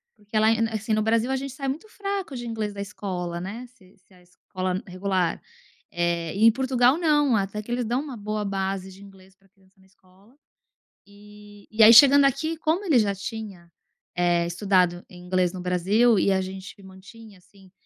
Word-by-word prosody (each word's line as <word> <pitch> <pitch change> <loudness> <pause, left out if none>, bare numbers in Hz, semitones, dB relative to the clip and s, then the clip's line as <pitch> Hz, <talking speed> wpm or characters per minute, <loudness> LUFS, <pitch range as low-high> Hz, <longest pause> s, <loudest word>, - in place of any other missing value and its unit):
Porque 205 - -26
porque 215 +1 0
lá 220 +1 +4
é 225 0 0
assim, 220 +1 -2
no 215 - +1
Brasil 230 +3 +1
a - - +1
gente 270 0 -5
sai 275 0 -5
muito 315 +11 -5
fraco 395 -8 -5
de 240 - -6
inglês 220 -2 -3
da 200 - -6
escola, 180 -4 -5
né, 220 +7 -7
se 200 -6 -24
se 190 +1 -28
a 180 - -21
escola 185 +1 -5
regular, 185 -1 -2 0.5
é 170 0 -2
e 215 - 0
em 230 - +8
Portugal 260 +2 +2
não, 295 -6 +2
até 200 +1 -2
que 235 - -9
eles 245 +1 -1
dão 240 +4 -1
uma 280 -5 -8
boa 210 0 -4
base 195 -1 -3
de 190 - -15
inglês 190 -1 -17
pra 195 0 -31
criança 190 -1 -31
na 190 - -24
escola, 190 +5 -26 0.7
eh, 205 0 -16
e 220 +1 0
aí 225 +2 +9
chegando 280 +3 +8
aqui 315 +4 -1
como 320 +5 -1
ele 285 -9 +4
já 200 -2 0
tinha 195 -4 -8 0.5
é 175 -1 +2
estudado 180 -1 0
inglês 180 0 -2
no 180 - -7
Brasil, 195 +6 +2
e 195 - +2
a 190 0 +1
gente 190 +1 -9
mantinha 200 +2 -15
assim 190 +1 -22
205 Hz, 200 wpm, -24 LUFS, 185-235 Hz, 0.7 s, aí